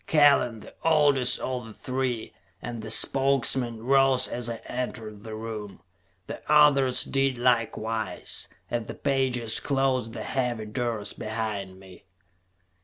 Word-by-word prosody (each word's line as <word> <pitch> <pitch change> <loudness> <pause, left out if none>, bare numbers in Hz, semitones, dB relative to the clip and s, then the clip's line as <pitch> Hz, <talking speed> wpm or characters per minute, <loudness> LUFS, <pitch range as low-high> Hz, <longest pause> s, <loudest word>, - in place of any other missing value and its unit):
Kellen, 140 -7 +4
the - - -13
oldest 145 -5 +4
of 125 -3 -3
the 110 - -12
three, 130 -3 -3 0.3
and 120 +1 -6
the 110 - -7
spokesman, 130 -2 +2
rose 135 0 +4
as 120 -1 -2
I 115 - -3
entered 115 -4 -5
the 110 -1 -7
room. 110 -2 -7 0.5
The - - -7
others 140 -4 +5
did 135 -2 0
likewise, 115 -2 -1 0.2
as 120 -2 -2
the - - -6
pages 130 -5 +1
closed 135 -4 0
the - - -5
heavy 125 -4 -2
doors 110 -2 -3
behind 105 -4 -4
me. 95 -1 -15
120 Hz, 130 wpm, -26 LUFS, 110-135 Hz, 0.5 s, others